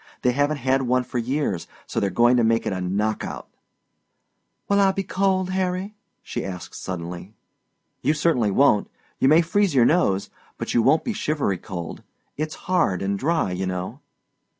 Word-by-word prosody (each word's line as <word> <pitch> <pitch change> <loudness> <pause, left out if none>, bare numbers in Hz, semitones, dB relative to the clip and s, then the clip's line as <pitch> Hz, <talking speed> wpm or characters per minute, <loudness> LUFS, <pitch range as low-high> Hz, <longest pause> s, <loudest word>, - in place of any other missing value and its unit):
They 125 - +4
haven't 145 +3 +1
had 135 0 +1
one 125 0 +1
for 125 - -3
years, 120 - -1 0.2
so - - -2
they're 100 -2 +1
gong 120 +4 +4
to 120 - +3
make 115 0 +2
it - - -1
a 95 - -3
knock 105 +4 -1
out." - - -6 1.2
"Will 200 0 +3
I 195 -1 +5
be 195 0 -2
cold, 190 0 0
Harry?" 185 +2 -1 0.3
she - - -4
asked 90 -2 -7
suddenly. 90 +3 -6 0.7
"You 155 - +2
certainly 145 -8 +2
won't. 105 0 +3 0.3
You - - +4
may 155 +4 +6
freeze 190 -1 +1
your 120 -3 +6
nose, 100 - +2 0.3
but - - -4
you 120 - +4
won't 145 +7 +3
be 235 - -2
shivery 145 - -1
cold. 90 -4 -6 0.3
It's 155 +1 -3
hard 100 - +1
and 100 0 -1
dry, 155 - +1
you 95 +1 -2
know." 90 0 -4
125 Hz, 175 wpm, -23 LUFS, 100-165 Hz, 1.2 s, may